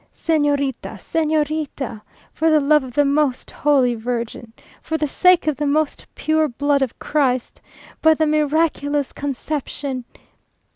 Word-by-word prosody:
"Señorita! 290 -5 0
Señorita! 305 -6 -2 0.3
For 320 +1 +1
the 310 -1 +5
love 300 +1 +4
of 255 -2 -9
the 290 +3 +3
most 280 -2 0
Holy 270 -4 +2
Virgin! 235 0 -4 0.3
For 320 - -2
the 305 - -1
sake 360 +4 +4
of 305 -3 0
the 295 - -1
most 300 +1 0
pure 315 0 +1
blood 285 +2 0
of 265 -4 -2
Christ! 255 -5 -1 0.4
By 320 0 +5
the 315 - +1
miraculous 300 -2 0
Conception! 280 -2 -4
290 Hz, 135 wpm, -20 LUFS, 270-310 Hz, 0.4 s, the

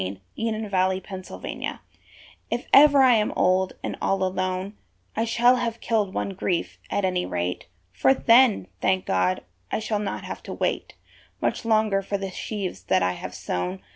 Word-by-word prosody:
On 95 +1 -4 0.2
the 225 - -1
Night 220 0 -3
of 205 -2 -8
a 185 0 +2
Friend's 190 0 -8
Wedding - - -5 0.7
If 240 +1 -2
ever 285 -1 +8
I 255 -1 +6
am 215 -2 +2
old, 185 +1 +2
and - - -3
all 195 -1 +1
alone, 185 +1 -2 0.4
I 225 - +1
shall 240 +2 +4
have 235 -2 -2
killed 215 -4 0
one - - -2
grief, 180 -2 -2
at 200 - 0
any 180 -1 0
rate; 90 0 -3 0.3
For 95 - +3
then, 245 -5 +5 0.2
thank 185 0 +1
God, 95 0 +1 0.3
I - - +1
shall 215 -1 -2
not 205 - -4
have - - -6
to - - -7
wait - - -2 0.4
Much - - -1
longer 215 -3 +2
for 200 +1 -2
the 195 -1 -5
sheaves 190 - -4
that 95 -1 +2
I 90 - +2
have - - -7
sown. 90 +2 -3
195 Hz, 185 wpm, -25 LUFS, 185-225 Hz, 0.7 s, ever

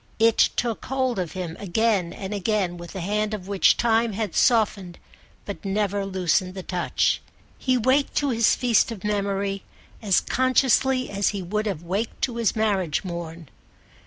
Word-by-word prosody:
It 225 0 +4
took 235 -3 -2
hold 260 -4 -1
of 175 -3 -3
him 180 -3 -5
again 200 -2 0
and 195 +1 -6
again 200 -3 -1
with 175 +1 -10
a 190 - -4
hand 210 +3 -1
of 190 -3 -9
which 200 -1 +3
time 230 -1 +2
had 210 -3 -3
softened 205 -6 +2 0.5
but 200 - -7
never 200 0 -1
loosened 185 0 0
the 190 - -6
touch. 180 -1 0 0.4
He 255 -1 +1
waked 260 +4 +1
to 285 - +1
his 230 -2 +3
feast 240 -2 +2
of 210 -5 -8
memory 200 -1 -1 0.4
as 200 -4 +3
consciously 260 0 +2
as 200 0 0
he 200 -2 -1
would 210 +4 -2
have 180 -5 -3
waked 195 +6 -3
to 240 -3 -1
his 230 -1 +1
marriage 195 -7 0
morn. 170 -3 -6
205 Hz, 165 wpm, -24 LUFS, 185-230 Hz, 0.5 s, It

